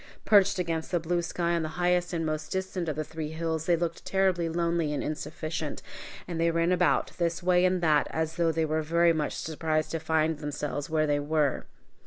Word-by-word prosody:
Perched 200 Hz, -1 st, +5 dB
against 165 Hz, -3 st, -2 dB
the 175 Hz, -, +1 dB
blue 170 Hz, +1 st, 0 dB
sky 170 Hz, 0 st, -1 dB
on 170 Hz, -, +1 dB
the 160 Hz, -, -2 dB
highest 180 Hz, 0 st, +1 dB
and 165 Hz, -2 st, -1 dB
most 155 Hz, 0 st, -3 dB
distant 190 Hz, -2 st, -2 dB
of 155 Hz, -, -2 dB
the 155 Hz, -, -2 dB
three 155 Hz, 0 st, -6 dB
hills, 160 Hz, -1 st, -2 dB
they 175 Hz, -, +5 dB
looked 170 Hz, 0 st, -3 dB
terribly 185 Hz, -3 st, +1 dB
lonely 170 Hz, -2 st, 0 dB
and -, -, -2 dB
insufficient, 155 Hz, 0 st, -4 dB, 0.4 s
and 170 Hz, -2 st, -3 dB
they 170 Hz, -, +3 dB
ran 165 Hz, +1 st, +1 dB
about, 180 Hz, -1 st, +2 dB
this 170 Hz, 0 st, -1 dB
way 180 Hz, 0 st, +4 dB
and 185 Hz, -1 st, +2 dB
that, 155 Hz, -3 st, +3 dB
as 160 Hz, 0 st, -2 dB
though 170 Hz, -1 st, +3 dB
they 160 Hz, 0 st, 0 dB
were 155 Hz, +1 st, 0 dB
very 170 Hz, +2 st, +3 dB
much 155 Hz, -2 st, -1 dB
surprised 155 Hz, 0 st, -1 dB
to 165 Hz, -, -2 dB
find 160 Hz, -1 st, +1 dB
themselves 145 Hz, -1 st, -4 dB
where 155 Hz, -1 st, +2 dB
they 145 Hz, -1 st, +1 dB
were. 145 Hz, -1 st, 0 dB
165 Hz, 210 wpm, -28 LUFS, 155-175 Hz, 0.4 s, Perched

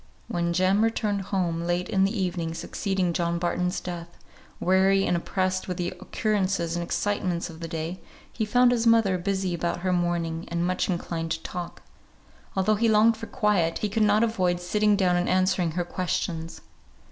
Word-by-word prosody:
When 170 Hz, 0 st, -1 dB
Jem 185 Hz, +4 st, +3 dB
returned 215 Hz, -3 st, 0 dB
home 175 Hz, -4 st, 0 dB
late 175 Hz, +1 st, -1 dB
in 190 Hz, -1 st, +2 dB
the 200 Hz, +2 st, -1 dB
evening 175 Hz, -3 st, -2 dB
succeeding 190 Hz, -1 st, -1 dB
John 170 Hz, 0 st, 0 dB
Barton's 180 Hz, +1 st, -1 dB
death, 175 Hz, -1 st, -6 dB, 0.5 s
weary 190 Hz, +1 st, +3 dB
and -, -, +1 dB
oppressed 185 Hz, +2 st, -1 dB
with 180 Hz, -2 st, -3 dB
the 175 Hz, -1 st, -1 dB
occurrences 195 Hz, -5 st, -1 dB
and 175 Hz, -, -1 dB
excitements 180 Hz, -1 st, -1 dB
of 160 Hz, -, -12 dB
the 165 Hz, -, -5 dB
day, 165 Hz, +2 st, -4 dB, 0.3 s
he 225 Hz, -, -2 dB
found 245 Hz, +3 st, +4 dB
his 235 Hz, -1 st, +1 dB
mother 220 Hz, -5 st, +4 dB
busy 190 Hz, 0 st, -1 dB
about 170 Hz, +1 st, -2 dB
her 185 Hz, 0 st, 0 dB
mourning, 170 Hz, -1 st, -1 dB
and 170 Hz, 0 st, -1 dB
much 185 Hz, +2 st, 0 dB
inclined 170 Hz, -2 st, -2 dB
to 165 Hz, -, -6 dB
talk. 175 Hz, -1 st, -6 dB, 0.7 s
Although 200 Hz, +2 st, +2 dB
he 230 Hz, +1 st, +2 dB
longed 220 Hz, +1 st, +5 dB
for 225 Hz, -, -8 dB
quiet, 190 Hz, -6 st, +1 dB
he 210 Hz, -, -2 dB
could 220 Hz, +2 st, -1 dB
not 210 Hz, +1 st, +4 dB
avoid 185 Hz, -6 st, +1 dB
sitting 210 Hz, +4 st, +2 dB
down 185 Hz, -3 st, +2 dB
and 175 Hz, -, 0 dB
answering 185 Hz, -3 st, +2 dB
her 175 Hz, +1 st, -1 dB
questions. 175 Hz, -2 st, -3 dB
185 Hz, 180 wpm, -26 LUFS, 170-200 Hz, 0.7 s, longed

